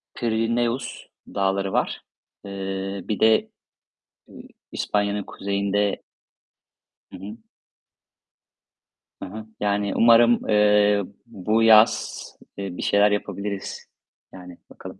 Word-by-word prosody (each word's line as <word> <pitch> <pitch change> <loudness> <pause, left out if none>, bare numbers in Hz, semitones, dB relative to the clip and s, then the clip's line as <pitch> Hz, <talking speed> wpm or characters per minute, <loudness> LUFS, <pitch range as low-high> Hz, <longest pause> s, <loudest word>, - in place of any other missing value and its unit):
Pirineus 115 +2 -2 0.3
Dağları 95 0 -1
var. - - -1 0.4
Eee, 95 0 -5
bir 105 - -2
de, 110 0 +3 0.8
eee, - - -12 0.3
İspanya'nın 105 0 -1
kuzeyinde 100 0 -2 1.1
Hı - - -9
hı. 105 +4 -9 1.9
Hı - - -4
hı. 110 +2 -8
Yani, 100 -1 -1
umarım, 115 0 +4
eee, 105 -1 +4 0.2
bu 110 0 -1
yaz, 110 0 +4 0.3
eee, 95 -3 -6
bir - - -5
şeyler 105 +1 +3
yapabiliriz. 100 -1 -4 0.5
Yani, 90 -1 -11
bakalım. - - -11
105 Hz, 95 wpm, -23 LUFS, 100-110 Hz, 1.9 s, umarım